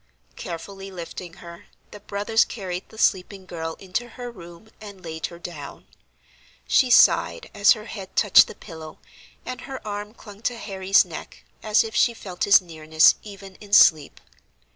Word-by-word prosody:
Carefully 195 +3 -8
lifting 175 -1 -8
her, 170 0 -12 0.2
the 210 - -11
brothers 205 +2 +1
carried 185 -4 -6
the 220 - -15
sleeping 190 -2 0
girl 165 -2 -6
into 195 +6 -5
her 245 0 -8
room, 175 +1 -14
and 200 -3 -11
laid 160 -1 -5
her 170 - -12
down. 170 -5 -9 0.8
She 260 - +3
sighed 485 - +4
as 205 0 +5
her 215 -2 -10
head 195 -4 -9
touched 205 -4 +6
the - - -10
pillow, 160 -2 -11 0.5
and 255 - -6
her 270 -1 -7
arm 205 +1 -6
clung 205 -2 -14
to 240 +1 -2
Harry's 195 -3 +2
neck, - - -10 0.2
as 215 0 +3
if 220 -1 -7
she 235 - +3
felt 185 -5 -4
his 200 -1 +6
nearness 160 -2 +3
even 195 -2 -12
in 205 -1 -14
sleep. 155 -7 +5
195 Hz, 165 wpm, -23 LUFS, 170-215 Hz, 0.8 s, touched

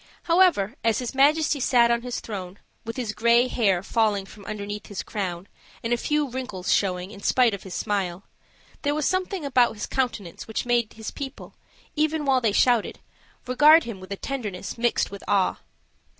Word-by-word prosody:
However, 335 - +3
as 225 -1 +2
his 250 0 -3
Majesty 295 +2 +3
sat 240 -2 +4
on 235 0 +1
his 245 0 -4
throne, 190 -3 -7 0.3
with 230 +2 -6
his 230 -4 -3
gray 235 +3 +4
hair 195 -8 +1
falling 210 -3 +1
from 200 +1 -14
underneath 205 0 -5
his 205 - -5
crown, 185 -3 -4 0.4
and 230 +1 0
a - - +2
few 300 +3 0
wrinkles 240 -8 -3
showing 185 -1 0
in 200 -2 -11
spite 245 -1 +3
of 200 - -5
his 190 -2 -8
smile, 195 -3 -2 0.6
there 290 0 0
was 305 -2 -1
something 370 -3 -1
about 250 -4 +3
his 210 - -4
countenance 230 -10 -3
which 220 - -3
made 240 -2 +1
his 220 -1 -7
people, 275 -2 -8 0.4
even 310 0 0
while 265 -2 +3
they 225 -3 +2
shouted, 235 +1 +2 0.5
regard 295 +6 +6
him 230 -5 -7
with 185 +1 -12
a - - -1
tenderness 215 -9 -5
mixed 240 -3 0
with 200 - -9
awe. 200 -2 +2
230 Hz, 180 wpm, -25 LUFS, 200-265 Hz, 0.6 s, regard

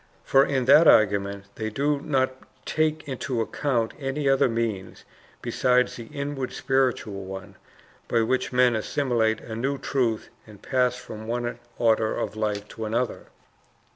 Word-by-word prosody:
For 135 0 +5
in 135 -3 0
that 150 +5 +7
argument 100 -3 +4
they 110 0 -4
do 140 +5 0
not 135 -4 +1 0.3
take 155 0 0
into 130 -2 -3
account 115 0 -1
any 140 +1 -2
other 135 -1 +4
means, 115 -5 -3 0.4
besides 125 0 +2
the 115 - -8
inward 140 -1 -4
spiritual 125 -7 0
one, 95 0 -8 0.5
by 115 -1 +2
which 130 +3 0
men 125 -1 +4
assimilate 115 -2 0
a 110 - -7
new 135 +5 -1
truth 125 -5 -1 0.2
and 105 -2 -13
pass 125 -1 +1
from 110 -3 -9
one 120 +1 -2 0.2
order 110 -2 +2
of - - -3
life 105 -1 -2
to 110 - -6
another. 115 +3 -2
120 Hz, 145 wpm, -25 LUFS, 110-135 Hz, 0.5 s, that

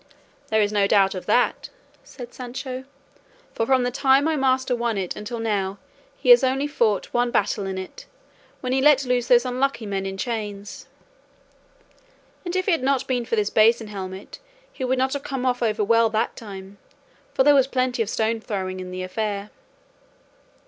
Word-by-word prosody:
"There 220 -1 +2
is 205 - -1
no 205 -1 +2
doubt 195 -2 +3
of 185 - -7
that," 245 +4 +1 0.3
said 245 -2 -11
Sancho, 255 +1 -6 0.7
"for 225 - -1
from 260 -2 +3
the 245 - -1
time 265 +2 +3
my 320 +1 +1
master 260 -2 +1
won 235 -2 -1
it 185 -2 -3
until 220 +3 -6
now 205 -4 -1 0.4
he - - -2
has 485 - +8
only 265 +2 +1
fought 225 -9 0
one 240 0 +2
battle 205 -2 0
in 190 -1 -4
it, 190 - -8 0.5
when 255 -1 -2
he 265 - +2
let 280 -1 +5
loose 250 -1 0
those 245 0 +5
unlucky 255 -2 -1
men 195 -1 -3
in 195 0 -5
chains; 205 -3 -5 1.6
and 350 -1 -4
if 370 0 0
had 335 -8 +1
not 270 0 +1
been 245 -2 -1
for 230 - -1
this 210 -2 0
basin 225 0 +3
helmet 190 -1 -8 0.3
he - - -6
would 255 +1 0
not 260 +1 +1
have 285 - -3
come 265 -2 -4
off 250 -1 0
over 220 -2 +1
well 230 +2 +3
that 220 0 -1
time, 195 -2 -10 0.6
for 265 - +4
there 290 +1 +6
was 270 -2 +4
plenty 255 -2 0
of 215 - -1
stone 225 +1 -1
throwing 190 -4 -4
in 185 0 -7
that 185 0 -5
affair." 205 +1 -3
235 Hz, 185 wpm, -23 LUFS, 205-260 Hz, 1.6 s, has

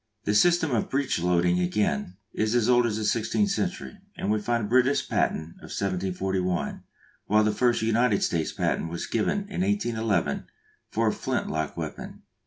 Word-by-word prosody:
The 105 - 0
system 170 +7 +4
of 115 -3 0
breech 135 -6 0
loading, 90 0 +2
again, 90 -3 -1 0.2
is 110 +2 0
as 120 -3 +3
old 120 -1 +4
as 110 -2 -2
the 110 - -2
sixteenth 115 - +1
century, 195 +1 -3 0.2
and 100 - -1
we 105 0 +1
find 115 0 0
a - - -4
British 130 +4 +3
patent 80 +1 0
of - - -13
1741; 95 -1 -2 0.5
while 110 +1 +4
the 110 - +2
first 120 0 +1
United 115 -1 +2
States 80 -2 0
patent 80 - -1
was 85 +1 -4
given 200 - -1
in 195 -3 -3
1811 115 - 0 0.4
for - - +1
a - - -1
flint - - -2
lock 80 -1 -3
weapon. - - -6
110 Hz, 175 wpm, -26 LUFS, 90-125 Hz, 0.5 s, system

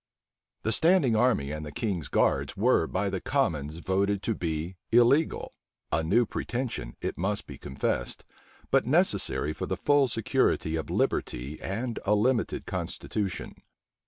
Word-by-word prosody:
The 110 - 0
standing 160 -5 +4
army 110 - +2
and 75 0 -4
the 75 - -7
king's 95 - -2
guards - - +1
were 105 -6 +3
by 100 +1 -1
the 95 -2 -3
commons 80 - 0
voted 95 +3 0
to 115 - +1
be 85 -1 -3 0.2
illegal; 120 +7 +3 0.4
a 75 - +2
new 105 +10 +3
pretension, 120 - -4
it - - -3
must 100 +3 0
be - - -10
confessed, 60 -2 -2 0.5
but - - +3
necessary 75 - +2
for - - -5
the - - -2
full 145 -2 +3
security 110 -8 +1
of 80 - -4
liberty 65 +5 -1
and 115 +4 -3
a 105 +2 +3
limited 115 +3 +1
constitution. 100 -4 -4
100 Hz, 145 wpm, -28 LUFS, 80-120 Hz, 0.5 s, standing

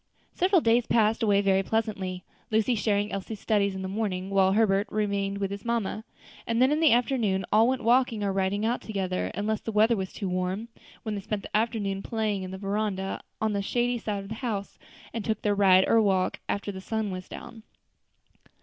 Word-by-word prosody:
Several 365 -1 +3
days 230 0 +3
passed 220 0 +2
away 205 -3 +3
very 195 -1 +3
pleasantly, 195 -4 -2 0.3
Lucy 220 +3 +2
sharing 205 -2 0
Elsie's 195 +2 -5
studies 200 -3 +1
in 190 - -5
the - - -3
mornings, 195 -2 -3
while 190 -1 +4
Herbert 205 -1 +3
remained 200 -2 -1
with 200 -1 -2
his 200 0 -6
mamma; 230 -2 -2 0.4
and 230 0 0
then 260 +2 +5
in 300 - +2
the 320 -3 +5
afternoon 230 -6 +1
all 220 +2 +6
walking 245 -3 +2
or 200 -1 0
riding 195 +2 0
out 240 +2 0
together, 190 -4 -2
unless 210 +1 -1
the 225 - -4
weather 220 +2 +4
was 190 -2 -4
too 200 - -4
warm, 185 +5 -2 0.3
when 220 - -3
they 200 - -3
spent 205 +1 -4
the - - -6
afternoon 210 -3 0
playing 215 -3 -2
in 185 - -5
the 190 - -6
veranda, 195 -1 -2 0.2
on 220 -1 0
the 200 - 0
shady 240 +4 0
side 205 -3 -3
of 195 - -11
the - - -4
house, 210 -6 -4 0.3
and 225 - -3
took 220 -1 -2
their 210 - +2
ride 190 -2 +5
or 230 - +5
walk 190 -3 +1
after 205 0 -2
the 190 -1 -8
sun 220 0 -2
was 185 0 -6
down. 230 -1 -9
205 Hz, 205 wpm, -27 LUFS, 195-225 Hz, 0.4 s, all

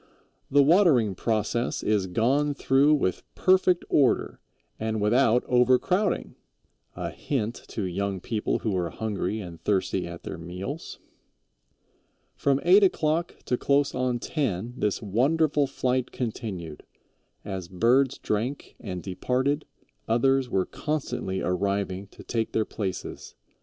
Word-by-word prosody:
"The 145 +1 +5
watering 145 - +4
process 115 +4 -1
is 105 -3 +1
gone 135 +9 +1
through 140 +3 +4
with 95 -11 -1
perfect 185 -1 +3
order 140 -4 +2 0.4
and 110 0 -1
without 120 +3 +3
overcrowding" 130 - +2 0.6
a - - -4
hint 120 -5 -2
to 110 - -4
young 95 +1 -2
people 110 +3 -1
who 105 -3 +1
are 90 -2 -1
hungry 105 +2 -3
and 85 -4 -9
thirsty 95 -2 0
at 85 0 -9
their - - -6
meals. 90 - -6 1.4
"From 140 -1 +1
eight 185 +4 +7
o'clock 170 -3 +1
to 125 - 0
close 140 +1 +2
on 125 -1 0
ten 120 - -2
this 105 -1 -1
wonderful 145 +7 +2
flight 130 -1 -1
continued; 100 - -5 0.6
as 95 -3 -5
birds 120 +8 +2
drank 120 +7 -3
and 90 -1 -6
departed, 130 +10 -1 0.4
others 130 +3 +2
were 95 -4 +1
constantly 140 -11 -3
arriving 100 +1 -1
to - - -14
take 115 -1 -2
their 110 - +1
places. 95 -4 -5
115 Hz, 125 wpm, -26 LUFS, 95-140 Hz, 1.4 s, eight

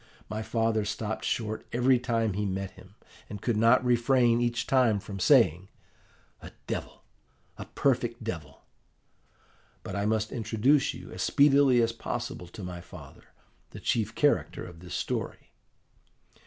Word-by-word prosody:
My 110 0 -3
father 115 -1 0
stopped 105 +1 -4
short 110 -1 -2
every 125 +1 +3
time 115 -4 0
he 105 +2 -2
met 95 -1 -3
him, - - -17 0.3
and 105 - -6
could 115 +2 -1
not 115 +4 +4
refrain 120 -1 +3
each 120 -1 0
time 125 -6 +3
from 100 0 -8
saying, 90 +1 +4 0.7
'A - - -9 0.2
devil, - - -5 0.5
a - - -8
perfect 120 -3 -1
devil!' 80 -10 -7 1.2
But 95 - -6
I 100 +1 -1
must 110 0 0
introduce 120 +4 +1
you - - -10
as - - -6
speedily 140 -4 +4
as 115 - +1
possible 100 -5 -5
to 100 +4 -10
my 90 -1 -6
father, 85 -5 -13 0.4
the - - -10
chief 110 -1 -1
character 145 -1 +1
of 85 -2 -12
this 90 -3 -7
story. - - -4
110 Hz, 145 wpm, -28 LUFS, 100-120 Hz, 1.2 s, not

